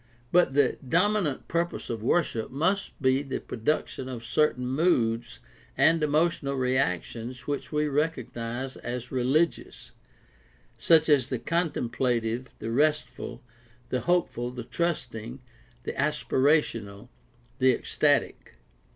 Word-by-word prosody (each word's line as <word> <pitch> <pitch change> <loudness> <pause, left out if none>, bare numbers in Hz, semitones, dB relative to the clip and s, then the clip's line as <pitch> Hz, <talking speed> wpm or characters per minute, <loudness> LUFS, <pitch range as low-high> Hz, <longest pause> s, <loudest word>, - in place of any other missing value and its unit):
But 175 -6 +4
the 145 -3 +3
dominant 180 -3 +1
purpose 170 +1 -2
of 115 -2 -4
worship 120 -3 0
must 185 +9 -1
be 130 -1 +3
the 135 -2 -4
production 130 +1 -2
of 120 -3 -6
cer 150 +7 +3
tain 125 +1 -6
moods 120 -5 +1 0.4
and 165 0 +4
emotional 150 -2 +1
reactions 125 -1 -1
which 145 0 -3
we 150 0 +1
recognize 130 -4 -2
as 125 0 -5
religious, 135 +6 0 0.8
such 160 -2 +4
as 140 -4 +3
the 130 - -1
contemplative, 125 -6 -1
the 110 +1 -5
restful, 130 -3 0 0.5
the 125 - 0
hopeful, 170 -9 0
the 125 -1 -7
trusting, 125 -6 -3 0.4
the - - -4
aspirational, 120 -7 0 0.5
the 130 0 +5
ecstatic. 115 - 0
130 Hz, 115 wpm, -27 LUFS, 120-155 Hz, 0.8 s, the